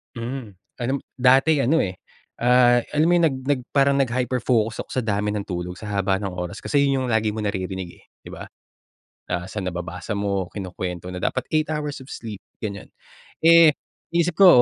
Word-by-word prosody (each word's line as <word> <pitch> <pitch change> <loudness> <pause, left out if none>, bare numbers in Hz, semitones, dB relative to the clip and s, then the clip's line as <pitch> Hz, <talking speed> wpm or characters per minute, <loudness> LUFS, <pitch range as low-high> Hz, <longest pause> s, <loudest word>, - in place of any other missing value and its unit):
Hmm, 120 -3 -6 0.2
alam 130 +3 -1 0.2
dati 135 +4 +5
ano, 145 +5 +3
eh, 90 -1 -4 0.4
ah, 120 0 +5
alam 150 +1 +3
mo - - +4
yung, 170 - +4
nag 135 - -2
nag 135 -1 0
parang 140 0 +4
nag-hyper 125 -1 0
focus 115 -2 +1
ako - - -6
sa 130 - 0
dami 105 -1 0
ng 105 - -2
tulog, 90 -2 -5
sa 105 +2 -8
haba 95 0 +2
ng 100 -2 -3
oras. 90 -1 -6
Kasi 140 -1 +2
yun 135 -1 +1
yung - - -2
lagi 110 -1 +1
mong 105 -2 -1
naririnig, 95 -2 -4
eh, - - -23 0.2
di - - -10
ba? - - -8 0.8
Ah, 90 0 -2
sa 100 +3 -5
nababasa 90 +2 -4
mo, 100 -3 -1
kinukwento 90 -3 -5
na, 90 - -6
"Dapat 130 - -1
8 155 0 +2
hours 150 -3 -3
of 130 - -13
sleep." 110 -4 -7 0.2
Ganyan. 100 -3 -6 0.6
Eh, 165 -2 +8 0.4
isip 170 +1 +1
ko, 195 - +10
115 Hz, 195 wpm, -23 LUFS, 95-135 Hz, 0.8 s, ko